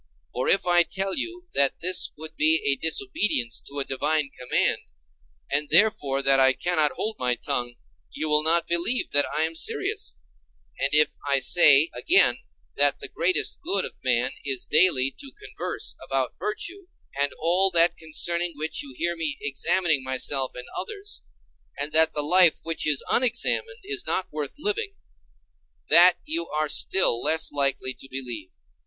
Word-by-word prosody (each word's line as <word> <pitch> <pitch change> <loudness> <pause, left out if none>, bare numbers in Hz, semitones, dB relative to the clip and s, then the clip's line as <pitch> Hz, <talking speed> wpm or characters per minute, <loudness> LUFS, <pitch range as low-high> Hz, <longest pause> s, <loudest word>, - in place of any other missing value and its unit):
For 125 - -2
if 195 - +2
I 175 -1 +4
tell 195 +2 -2
you 350 +5 -5
that 140 -1 +2
this 185 +2 +1
would 160 +1 -7
be 155 +1 +4
a 140 - +2
disobedience 160 - 0
to 140 - -9
a 140 - -1
divine 145 +1 -2
command, 125 0 -1 0.7
and 145 +1 -1
therefore 155 -7 +3
that 135 0 +4
I 130 0 +5
cannot 155 -1 0
hold 220 0 -4
my 125 -1 0
tongue, 120 +1 -4 0.4
you 155 - -5
will 150 0 +2
not 165 +2 +2
believe 170 +9 0
that 145 0 +3
I 155 - 0
am 160 +1 -2
serious; 65 - -3 0.6
and - - +1
if 150 0 +3
I 140 -1 +2
say 145 +2 +5
again 365 +4 +3 0.4
that - - +3
the - - -6
greatest 370 - 0
good 365 +5 0
of - - -8
man - - 0
is 380 -2 -2
daily 135 -8 +3
to 275 -2 -11
converse 420 0 -5
about 135 -2 -2
virtue, 345 - -5 0.3
and 145 - +2
all 180 +4 +2
that 170 -1 +3
concerning 170 +2 -2
which 155 +1 -3
you 135 -3 -10
hear 170 +1 -1
me 155 -4 -4
examining 160 +1 0
myself 130 0 -1
and 125 - -7
others, 415 -2 -7 0.6
and 145 +2 -3
that 160 0 +5
the 150 - 0
life 175 +2 +4
which 165 -1 -2
is 145 -3 +2
unexamined 255 - 0
is 410 0 -5
not 185 - -1
worth 150 -2 -4
living—that 410 +4 0
you 330 +3 -2
are 155 0 -2
still 150 -8 +2
less 160 0 +1
likely 135 -2 0
to 135 - -14
believe. 120 -7 -6
160 Hz, 160 wpm, -24 LUFS, 140-195 Hz, 0.7 s, I